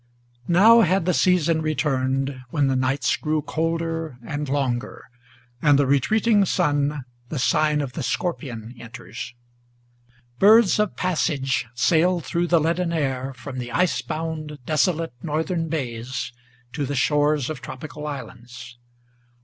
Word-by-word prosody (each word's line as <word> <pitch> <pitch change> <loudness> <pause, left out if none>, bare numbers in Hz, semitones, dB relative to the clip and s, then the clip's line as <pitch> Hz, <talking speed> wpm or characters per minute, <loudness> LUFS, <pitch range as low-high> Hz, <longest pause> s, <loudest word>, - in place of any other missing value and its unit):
NOW 220 +7 +7
had 185 -2 +2
the 180 - +2
season 170 -3 +2
returned, 135 -3 0
when 145 +1 +1
the 135 -1 +1
nights 130 +2 +1
grow 155 0 -1
colder 165 -2 -2
and 145 -1 -4
longer, 130 -3 -2 0.6
And 145 -2 +5
the 140 - +3
retreating 205 - +3
sun 145 -6 0 0.2
the 155 - -4
sign 150 +2 +2
of 135 -3 -5
the 155 - -4
Scorpion 125 -6 -3
enters. 120 +1 -9 1.0
Birds 215 0 +6
of 210 -3 0
passage 145 -8 0
sailed 170 +5 +2
through 170 +6 -1
the 170 -1 +4
leaden 165 +2 0
air, 135 -4 -1
from 130 +1 -7
the 120 -1 -5
ice 180 +5 +1
bound, 155 -1 -5
Desolate 165 0 0
northern 165 +2 -2
bays 125 -4 -4 0.4
to 140 +1 -2
the 145 - -3
shores 145 0 +2
of 155 - -7
tropical 150 +2 -7
islands. 120 -3 -9
150 Hz, 135 wpm, -23 LUFS, 130-165 Hz, 1.0 s, NOW